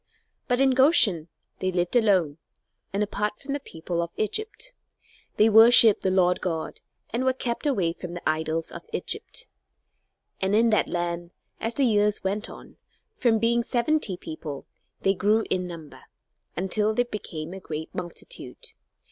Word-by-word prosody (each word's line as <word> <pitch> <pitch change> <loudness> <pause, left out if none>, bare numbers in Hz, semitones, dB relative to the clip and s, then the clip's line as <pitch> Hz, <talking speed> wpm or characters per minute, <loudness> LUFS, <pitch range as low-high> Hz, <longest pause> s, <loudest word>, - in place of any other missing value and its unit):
But 245 -1 +1
in 270 0 +4
Goshen 255 - +5 0.3
they 185 0 -1
lived 175 +4 -1
alone 185 -10 +3 0.5
and 200 +2 0
apart 210 0 -2
from 275 0 -5
the 285 - -2
people 170 - -4
of 170 - -3
Egypt. 435 - -3 0.6
They 215 - +6
worshipped 225 0 +8
the 190 - +1
Lord 180 -1 +2
God, 165 -3 -4 0.3
and 240 +3 -1
were 260 0 +2
kept 250 +2 -3
away 185 -12 +1
from 175 0 -8
the 175 - -5
idols 160 +1 -1
of - - -7
Egypt. - - -3 1.0
And 195 +2 +1
in 230 +1 +4
that 215 - +2
land, 175 -1 -3 0.3
as 225 +1 -2
the 275 - +3
years 210 -2 +2
went 200 +3 -2
on, - - -13 0.4
from 235 - +2
being 235 +2 +2
seventy 240 -4 0
people, 155 -4 -7 0.4
they 195 - +3
grew 210 +3 +2
in 180 -1 0
number 165 -4 -10 0.6
until 210 +4 +1
they 245 - +3
became 175 -8 -6
a 195 - -7
great 160 -3 -6
multitude. 485 - -5
205 Hz, 155 wpm, -25 LUFS, 175-235 Hz, 1.0 s, worshipped